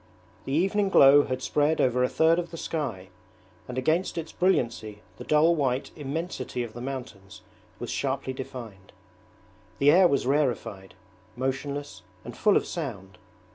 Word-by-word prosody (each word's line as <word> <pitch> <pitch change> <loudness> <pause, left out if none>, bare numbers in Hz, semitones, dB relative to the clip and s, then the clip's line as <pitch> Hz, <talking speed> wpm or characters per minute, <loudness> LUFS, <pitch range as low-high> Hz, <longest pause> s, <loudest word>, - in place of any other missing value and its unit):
The 135 - -3
evening 195 +5 +1
glow 145 -4 +7
had 130 0 -4
spread 150 +2 +1
over 125 0 +2
a 125 - +2
third 165 +2 +3
of 170 -1 -4
the 165 - -8
sky, 135 - -4 0.6
and 125 - -6
against 160 +9 0
its 165 -1 -4
brilliancy 115 - -1
the - - -8
dull 155 +3 +4
white 135 -4 -1
immensity 145 -4 -4
of 115 -2 -8
the 120 - -8
mountains 110 -6 -7 0.4
was 120 - -6
sharply 135 -1 -2
defined. 115 -7 -9 0.8
The 140 +1 +5
air 180 +3 +6
was 140 -5 0
rarefied, 115 -9 -1 0.4
motionless, 135 -4 -4 0.2
and 120 - -8
full 210 -2 +3
of - - -1
sound. 100 - -6
135 Hz, 150 wpm, -26 LUFS, 120-160 Hz, 0.8 s, glow